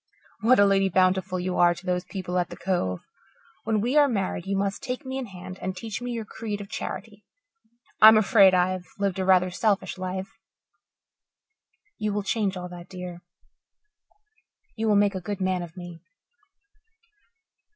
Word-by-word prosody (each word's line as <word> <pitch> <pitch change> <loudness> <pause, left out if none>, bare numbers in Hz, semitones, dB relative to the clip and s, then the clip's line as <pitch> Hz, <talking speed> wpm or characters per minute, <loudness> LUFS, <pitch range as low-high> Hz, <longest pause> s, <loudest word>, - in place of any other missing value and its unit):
What 240 +4 +4
a 205 - +6
Lady 195 -1 +3
Bountiful 185 0 +1
you 180 0 -2
are 175 0 +5
to 185 - -13
those 180 0 -1
people 180 -2 -3
at 175 - -1
the - - -9
Cove. 95 - -1 0.6
When 220 -2 +1
we 250 +7 +1
are 290 -1 +6
married 195 -6 -2
you 195 0 0
must 200 0 -2
take 255 +2 -5
me 260 +1 -4
in 255 - -5
hand 185 -1 -10
and 185 0 -4
teach 220 +1 -5
me 245 - -4
your 230 -2 -4
creed 210 -1 -5
of 200 -1 -9
charity. 210 -2 -6 0.8
I'm 220 0 +10
afraid 200 -3 +5
I've 180 0 0
lived 195 -2 -1
a 190 - 0
rather 185 -1 +4
selfish 200 -1 0
life. 185 +1 -4 1.7
You 210 -1 -1
will 205 0 -1
change 195 -1 -1
all 180 0 -5
that, 175 -1 -11
dear. 180 -2 -8 1.5
You 225 0 -2
will 210 - +4
make 205 0 +3
a 190 - -4
good 200 +2 -5
man 185 -1 0
of 170 0 -9
me." 175 -2 -9
190 Hz, 170 wpm, -25 LUFS, 180-210 Hz, 1.7 s, I'm